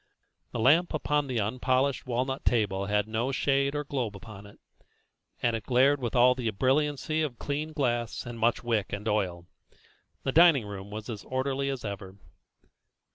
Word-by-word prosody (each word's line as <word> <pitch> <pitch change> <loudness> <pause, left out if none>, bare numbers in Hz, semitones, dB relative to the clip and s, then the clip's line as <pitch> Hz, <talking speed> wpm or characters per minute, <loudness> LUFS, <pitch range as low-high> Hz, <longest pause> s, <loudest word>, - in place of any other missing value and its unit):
The - - -5
lamp 155 +9 +4
upon 150 -1 0
the 125 -3 -1
unpolished 130 +5 0
walnut 130 +2 -2
table 100 -4 +1
had 105 0 +1
no 115 +4 -1
shade 140 +1 +1
or 145 - -1
globe 125 -7 -3
upon 105 0 -11
it, 100 - -16 0.9
and 120 -1 +2
it 110 - -4
glared 135 +3 +3
with 120 -1 -3
all 125 +1 +6
the 125 -3 -2
brilliancy 145 +7 0
of 140 -6 -2
clean 150 +4 -3
glass, 120 -6 -1
and 120 -1 -7
much 115 +2 +1
wick 115 -4 -1
and 105 +2 -4
oil. 95 -5 -1 0.8
The 135 - 0
dining 160 -6 +6
room 100 -1 -7
was 110 +1 -7 0.2
orderly 135 +1 -1
as 135 -4 -4
ever. 100 -2 -6
125 Hz, 165 wpm, -28 LUFS, 105-140 Hz, 0.9 s, all